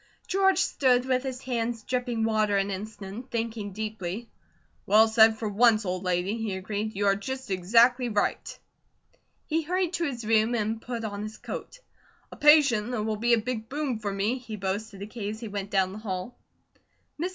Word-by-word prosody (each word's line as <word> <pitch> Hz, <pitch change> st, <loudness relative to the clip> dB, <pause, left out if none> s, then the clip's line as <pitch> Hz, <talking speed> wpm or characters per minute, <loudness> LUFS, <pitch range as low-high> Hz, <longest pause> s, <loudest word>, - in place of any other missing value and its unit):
George 385 Hz, -1 st, +3 dB
stood 255 Hz, -7 st, +2 dB
with 255 Hz, -1 st, +1 dB
his 260 Hz, -1 st, -5 dB
hands 235 Hz, -2 st, -2 dB
dripping 245 Hz, -2 st, -1 dB
water 215 Hz, -2 st, +2 dB
an 195 Hz, 0 st, 0 dB
instant, 210 Hz, +4 st, -7 dB
thinking 225 Hz, -3 st, -3 dB
deeply. 215 Hz, +1 st, -5 dB, 0.6 s
"Well 215 Hz, +3 st, +6 dB
said 220 Hz, 0 st, +5 dB
for 220 Hz, -, -3 dB
once, 215 Hz, +1 st, +4 dB
old 180 Hz, 0 st, -2 dB
lady," 180 Hz, +4 st, 0 dB
he 220 Hz, -4 st, -3 dB
agreed. 205 Hz, +3 st, -4 dB
"You 205 Hz, +1 st, 0 dB
are 195 Hz, 0 st, +4 dB
just 260 Hz, +3 st, -6 dB
exactly 235 Hz, +7 st, +4 dB
right." 210 Hz, -2 st, -1 dB, 0.9 s
He 320 Hz, +1 st, 0 dB
hurried 360 Hz, +2 st, -1 dB
to 340 Hz, -1 st, 0 dB
his 245 Hz, -6 st, -4 dB
room, 225 Hz, +2 st, +3 dB
and 220 Hz, 0 st, -1 dB
put 235 Hz, -1 st, -5 dB
on 205 Hz, -1 st, -4 dB
his 215 Hz, +1 st, -6 dB
coat. -, -, -7 dB, 0.5 s
"A -, -, -9 dB
patient 280 Hz, -8 st, +5 dB
that 245 Hz, -4 st, -2 dB
will 215 Hz, 0 st, -1 dB
be 235 Hz, +2 st, +2 dB
a -, -, 0 dB
big 225 Hz, -1 st, -4 dB
boom 275 Hz, -5 st, -2 dB
for 205 Hz, -2 st, -3 dB
me," 205 Hz, +6 st, -1 dB
he 230 Hz, -3 st, -7 dB
boasted 200 Hz, +1 st, -4 dB
to -, -, -4 dB
Kate 215 Hz, -1 st, -5 dB
as -, -, -13 dB
he 230 Hz, -, -6 dB
went 200 Hz, -1 st, -5 dB
down 190 Hz, -2 st, +1 dB
the 210 Hz, -, -7 dB
hall. 190 Hz, +1 st, -5 dB, 0.9 s
Mrs. 355 Hz, -, 0 dB
220 Hz, 190 wpm, -27 LUFS, 205-245 Hz, 0.9 s, Well